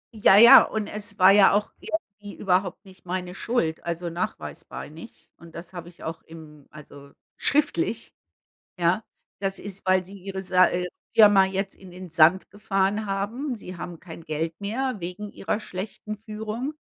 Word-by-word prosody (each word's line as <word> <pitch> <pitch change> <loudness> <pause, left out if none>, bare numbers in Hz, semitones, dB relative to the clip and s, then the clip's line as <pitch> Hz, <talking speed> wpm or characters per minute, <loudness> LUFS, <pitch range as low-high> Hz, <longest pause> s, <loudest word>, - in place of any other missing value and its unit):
Ja, 205 -2 +6
ja, 235 +2 +10
und 220 -1 -2
es 205 0 -7
war 185 0 +7
ja 200 -1 +6
auch 210 +1 0
irgendwie 205 -10 -6
überhaupt 185 +1 0
nicht 190 -2 -17
meine 180 0 -4
Schuld, 180 -8 -2
also, 170 0 -3
nachweisbar 170 +2 -6
nicht 165 +9 -14
und 170 -1 -15
das 170 +2 -9
habe 175 -1 -8
ich 175 - -17
auch 165 +1 -6
im 155 -3 -14
also, 140 -2 -14 0.2
schriftlich, 235 - 0 0.7
ja? 175 +5 +2 0.4
Das 195 -1 -2
ist, 200 -1 -9
weil 185 0 +2
sie 195 +3 -11
ihre 190 0 -6
Sa 185 0 +4
äh, 180 0 -2 0.3
Firma 205 -3 +7
jetzt 195 +1 -3
in 190 -2 -15
den 180 0 -10
Sand 165 +3 +4
gefahren 200 +1 -1
haben, 225 +7 -3
sie 185 -3 -9
haben 170 0 -7
kein 165 -1 -11
Geld 160 +1 -3
mehr 250 +6 -2
wegen 180 +4 -7
ihrer 205 - -2
schlechten 210 +2 -7
Führung, 220 +6 -5
190 Hz, 165 wpm, -25 LUFS, 175-210 Hz, 0.7 s, ja